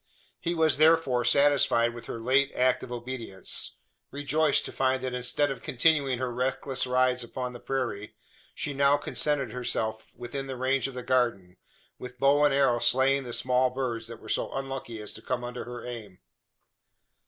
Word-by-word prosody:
He 170 0 -2
was, 160 -3 +3
therefore, 155 -6 +4
satisfied 135 -4 +3
with 120 - -10
her 115 - -5
late 135 +4 +2
act 130 0 +2
of 125 - -9
obedience 120 -5 -4 0.3
rejoiced 145 +1 +1
to - - -6
find 130 0 0
that 130 -1 -2
instead 125 +3 0
of 130 -4 -6
continuing 140 -1 +2
her 125 -1 -3
reckless 130 +1 -2
rides 125 0 +2
upon 125 +1 -5
the 120 - -9
prairie, 120 -7 -3 0.4
she 145 - -3
now 140 +1 +4
contented 145 -5 -1
herself 110 -3 -3
within 130 +3 -6
the 130 -1 -5
range 130 +1 +1
of 135 - -9
the 125 - -5
garden 115 -9 0 0.4
with 125 0 -9
bow 140 +3 +4
and 145 - +4
arrow 135 -3 +3
slaying 135 +2 +3
the 120 - -6
small 125 +1 +2
birds 125 -3 -3
that 115 0 -8
were - - -13
so - - -1
unlucky 135 -4 -5
as 105 -1 -6
to - - -11
come 125 -1 -3
under 120 0 -6
her 120 0 -8
aim. 110 -6 -7
130 Hz, 175 wpm, -28 LUFS, 120-135 Hz, 0.4 s, therefore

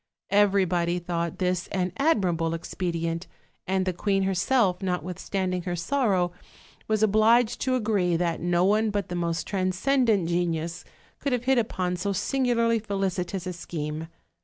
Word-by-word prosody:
Everybody 185 -4 +3
thought 170 -1 -3
this 180 -1 0
an 180 -2 -2
admirable 175 - +1
expedient, 165 0 -3 0.4
and 190 0 +1
the 185 - 0
queen 195 +2 0
herself, 190 +1 +2
notwithstand 185 +1 -2
ing 180 - -1
her 175 0 -3
sorrow, 185 -3 +1 0.6
was 215 0 +1
obliged 220 +3 +4
to 260 -1 +1
agree 205 -7 +1
that 170 -1 -1
no 175 +1 +2
one 215 +2 +3
but 205 -2 -2
the 175 - -3
most 170 0 -1
transcendent 200 +1 +1
genius 170 -1 -1 0.4
could 280 - -1
have 245 -1 0
hit 265 0 +3
upon 185 -5 -1
so 200 +3 -1
singu 250 +5 0
larly 230 -1 +2
felicitous 195 -2 -2
a 180 - -3
scheme. 160 -2 -5
185 Hz, 150 wpm, -26 LUFS, 175-215 Hz, 0.6 s, obliged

